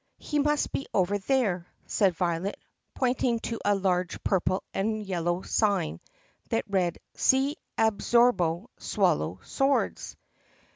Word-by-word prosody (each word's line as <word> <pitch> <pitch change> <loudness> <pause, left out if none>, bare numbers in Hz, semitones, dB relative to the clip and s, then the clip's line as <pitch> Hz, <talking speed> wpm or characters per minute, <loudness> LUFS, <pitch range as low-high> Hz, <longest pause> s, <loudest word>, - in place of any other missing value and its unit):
"He 300 - -2
must 295 +1 +1
be 275 - -3
over 195 +2 +2
there," 200 -7 0 0.2
said 195 -5 +2
Violet 175 +2 -1 0.4
pointing 245 -2 +1
to 230 - -4
a 205 - +3
large 185 -2 -1
purple 185 0 +1
and 215 +2 -1
yellow 175 -1 -1
sign 200 -7 +1 0.5
that 225 - 0
read, 185 -4 0 0.2
"SEE 270 +3 +2 0.2
ABSORBO 220 -3 +2
SWAL - - +2
LOW - - -5
SWORDS." 275 0 0
200 Hz, 125 wpm, -28 LUFS, 180-245 Hz, 0.5 s, a